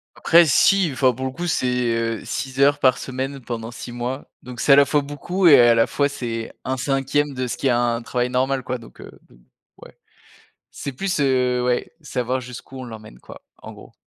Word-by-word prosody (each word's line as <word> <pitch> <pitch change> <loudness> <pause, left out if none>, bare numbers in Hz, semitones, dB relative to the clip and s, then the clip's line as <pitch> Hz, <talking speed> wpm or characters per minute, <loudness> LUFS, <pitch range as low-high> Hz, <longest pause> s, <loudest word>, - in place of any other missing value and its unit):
Après 170 0 +5
si, 185 +4 +4
enfin, 130 -1 +2
pour 130 +2 -5
le 130 - -2
coup 175 +6 -5
c'est, 125 -6 0
heu, 115 -1 -2
6 130 0 -5
heures 145 +1 +4
par 130 -2 +3
semaine 135 +1 -5
pendant 115 -2 -6
6 120 - -9
mois. 120 +3 -5
Donc 125 -1 -10
c'est 140 - +5
à - - +9
la 140 0 +6
fois 150 +1 +1
beaucoup, 145 +6 -1
et 140 -5 +8
à 120 -1 +6
la 115 - +4
fois 145 0 0
c'est 115 -4 -5
1/5 135 +2 -1
de 130 0 -3
ce - - -3
qui 135 - -1
est - - +3
un 120 -1 +1
travail 125 +1 -2
normal 130 +1 0
quoi, 125 +1 -3
donc, 115 - -16
heu, - - -11 0.7
ouais, - - -16 0.7
c'est 140 - -6
plus, 190 +3 -2
heu, 125 -3 +1
ouais, 125 0 -1
savoir 130 -3 -2
jusqu'où 125 +1 -10
on 130 - -6
l'emmène 110 - -11
quoi - - -13 0.2
en - - -8
gros. - - -15
130 Hz, 210 wpm, -21 LUFS, 120-140 Hz, 0.7 s, à